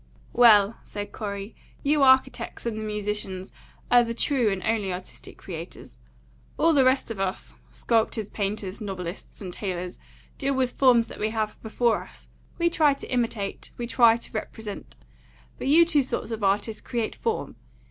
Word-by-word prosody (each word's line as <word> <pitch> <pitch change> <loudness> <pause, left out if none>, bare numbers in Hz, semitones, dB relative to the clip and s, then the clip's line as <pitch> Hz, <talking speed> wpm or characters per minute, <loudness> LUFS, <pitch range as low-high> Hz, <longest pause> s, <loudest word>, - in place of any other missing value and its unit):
"Well," 225 -3 +6
said 205 0 -7
Corey, 200 0 -6 0.3
"you 295 +1 +2
architects 260 -3 +3
and 230 -2 -1
the 220 - -4
musicians 210 -3 -3 0.4
are 245 0 +7
the 230 0 -4
true 250 -3 +2
and 190 -1 -3
only 220 -4 0
artistic 180 +1 -8
creators. - - -9 0.6
All 330 0 +4
the 275 -3 +5
rest 260 -2 +2
of 215 - -6
us, 195 -1 -3 0.2
sculptors, 225 -2 0
painters, 200 0 -4
novelists, 185 -2 -6
and 185 -3 -6
tailors, 180 -3 -4 0.4
deal 275 -1 0
with 255 -1 +1
forms 245 -4 +4
that - - -11
we 215 - 0
have 215 -1 -3
before 230 +1 +1
us; - - -15 0.3
we 340 - +2
try 310 -4 +3
to - - -10
imitate, 225 -5 -2
we 240 - -3
try 235 -1 +5
to 235 - -7
represent. 215 -1 -6 0.6
But - - -3
you 325 +4 +7
two 320 -4 +3
sorts 255 -2 -4
of 220 -2 -4
artists 205 +2 0
create 235 -3 -3
form. 455 -1 -3
225 Hz, 165 wpm, -26 LUFS, 200-250 Hz, 0.6 s, are